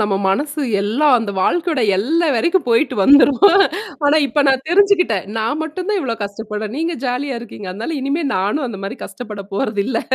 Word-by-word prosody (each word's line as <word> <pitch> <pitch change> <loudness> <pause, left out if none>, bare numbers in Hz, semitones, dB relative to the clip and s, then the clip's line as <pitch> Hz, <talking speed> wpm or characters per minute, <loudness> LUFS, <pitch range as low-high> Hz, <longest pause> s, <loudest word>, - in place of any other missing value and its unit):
நம்ம 205 -2 0
மனசு 290 +10 -1 0.2
எல்லாம் 255 +8 +2
அந்த 220 -3 -4
வாழ்க்கையோட 325 - 0 0.2
எல்லை 320 - +1
வரைக்கும் 340 +8 +1
போயிட்டு 235 +6 +2
வந்துரும். 285 - +6 0.6
ஆனா 290 +2 +4
இப்ப 290 +2 0
நான் 265 0 +2
தெரிஞ்சுக்கிட்டேன். 360 - +3
நான் 225 +7 -1
மட்டும் 360 +4 -5
தான் 420 -2 +1
இவ்ளோ 245 -7 -2
கஷ்டப்படறேன், 210 +1 -5
நீங்க 330 +2 -2
ஜாலியா 250 +1 -2
இருக்கீங்க. 210 -4 -10
அதனால 230 - -5
இனிமே 280 +5 -1
நானும் 205 +10 -1
அந்த 210 -5 -7
மாரி 200 +6 -5
கஷ்டப்பட 210 -5 -8
போறதில்ல. 215 +2 -1
260 Hz, 165 wpm, -18 LUFS, 215-310 Hz, 0.6 s, வந்துரும்